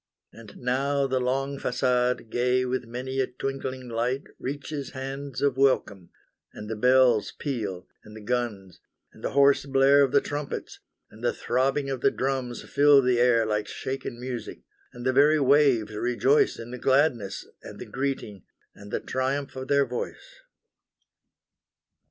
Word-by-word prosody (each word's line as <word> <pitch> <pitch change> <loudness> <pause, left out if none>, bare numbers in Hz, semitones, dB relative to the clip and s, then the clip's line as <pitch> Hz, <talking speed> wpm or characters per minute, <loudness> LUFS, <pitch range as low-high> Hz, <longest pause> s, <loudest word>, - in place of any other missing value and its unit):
And 110 -3 -13
now 135 +3 0
the 130 -1 0
long 135 +2 -1
facade 125 -2 0
gay 125 +1 +1
with 125 0 -2
many 130 +3 -4
a 130 - +1
twinkling 130 -1 -5
light 120 +4 -1 0.2
Reaches 140 +1 -5
hands 135 0 -5
of 140 -2 +1
welcome, 110 -9 +1 0.4
and 105 - -8
the 110 - -3
bells 125 -1 +4
peal, 105 -10 -4 0.2
and 105 0 -13
the 110 - -10
guns, 105 -5 -3 0.3
And - - -17
the - - -3
hoarse 140 0 +4
blare 135 +1 +5
of 135 -2 +3
the - - +5
trumpets, 145 -1 -5 0.3
and 110 +2 -15
the 120 - +2
throbbing 135 +3 0
of 130 -2 -4
the - - +4
drums 130 -2 -3
Fill 145 -1 +5
the 125 -1 +2
air 120 -2 +4
like 105 -1 -1
shaken 130 -2 -5
music, 125 -1 -6 0.3
and 120 0 -10
the 130 - +2
very 150 +3 +5
waves 135 -6 +3
rejoice 125 +6 +2
In 115 +1 -8
the 125 - -7
gladness, 130 -7 +1 0.2
and - - -10
the - - -8
greeting, 130 -7 -4 0.3
and 100 0 -13
the - - -2
triumph 135 +2 -2
of 130 0 -6
their 140 -1 +3
voice. 125 - -7
130 Hz, 155 wpm, -26 LUFS, 120-135 Hz, 0.4 s, blare